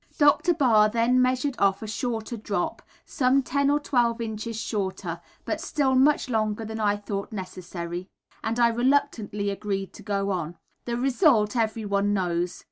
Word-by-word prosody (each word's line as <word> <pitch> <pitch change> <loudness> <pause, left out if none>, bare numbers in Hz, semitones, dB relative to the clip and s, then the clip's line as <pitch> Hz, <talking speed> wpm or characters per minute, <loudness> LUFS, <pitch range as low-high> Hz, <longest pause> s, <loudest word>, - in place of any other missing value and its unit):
Dr. 305 +4 +4
Barr 225 -8 +4
then 235 +3 +3
measured 255 +2 +1
off 195 +1 +2
a - - -5
shorter 225 +1 -3
drop, 205 -4 -3 0.2
some 265 -1 +2
ten 280 +2 +1
or 290 +1 +3
twelve 240 -5 +1
inches 220 0 -4
shorter, 200 -4 -3 0.2
but - - -2
still 275 -4 +1
much 280 +3 +4
longer 220 -2 -1
than 220 +1 -5
I 205 -1 +2
thought 200 0 -5
necessary, 180 -2 -6 0.4
and 230 +2 -1
I 235 -1 +5
reluctantly 230 -5 0
agreed 195 -1 -3
to - - -12
go 200 -1 -1
on. 175 -2 -3 0.3
The 235 -1 -2
result, 250 - +3
everyone 205 -3 0
knows. 175 -2 -1
220 Hz, 155 wpm, -26 LUFS, 200-255 Hz, 0.4 s, I